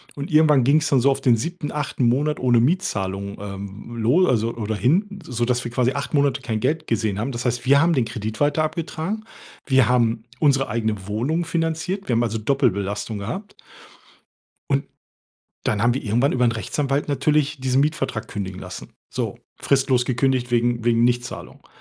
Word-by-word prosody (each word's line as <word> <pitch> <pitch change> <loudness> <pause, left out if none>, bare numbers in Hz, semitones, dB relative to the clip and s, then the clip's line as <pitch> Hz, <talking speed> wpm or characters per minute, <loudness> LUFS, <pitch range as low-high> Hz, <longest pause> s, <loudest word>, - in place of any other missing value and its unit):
Und 140 +1 -5
irgendwann 150 -4 +5
ging's 155 +5 +3
dann 135 - +4
so 135 +3 +4
auf 135 - 0
den 125 -3 +4
7., 165 +4 -4
8. 145 -4 -1
Monat 145 +5 +1
ohne 125 -2 +3
Mietzahlung, 100 - -1
ähm, 100 +3 -8
lo 125 +11 +3
also, 115 -1 +1
oder 110 -1 -3
hin, 190 - +1
sodass 125 -2 -1
wir 120 - -5
quasi 125 +1 +1
8 140 +1 -4
Monate 140 -3 +2
kein 110 -3 -2
Geld 155 +7 -1
gesehen 110 -5 -1
haben. 115 +6 -2
Das 120 0 -5
heißt, 120 0 -1
wir 140 +2 +5
haben 170 +1 +3
den 130 -6 +2
Kredit 110 -1 -5
weiter 145 +2 +2
abgetragen. 165 +6 -3 0.4
Wir 130 -3 +4
haben 115 -2 +2 0.2
unsere 140 -2 +3
eigene 110 -3 -2
Wohnung 130 +11 -1
finanziert. 165 +4 -2
Wir 125 - +1
haben 115 +1 +2
also 115 -1 -1
Doppelbelastung 110 -4 0
gehabt. 190 - -6 1.2
Und - - +1 0.8
dann 105 - 0
haben 120 +1 +3
wir 135 - -4
irgendwann 120 +5 +2
über 125 -1 +2
'n 120 - +3
Rechtsanwalt 135 +6 -2
natürlich 150 0 +1
diesen 130 +1 +2
Mietvertrag 140 -6 -1
kündigen 95 -2 -5
lassen. 90 -1 -9 0.2
So - - -3 0.2
fristlos 135 -3 +2
gekündigt 130 -1 0
wegen 120 -1 +1
wegen 115 -1 +3
Nichtzahlung. 120 0 -2
125 Hz, 175 wpm, -22 LUFS, 115-145 Hz, 1.2 s, irgendwann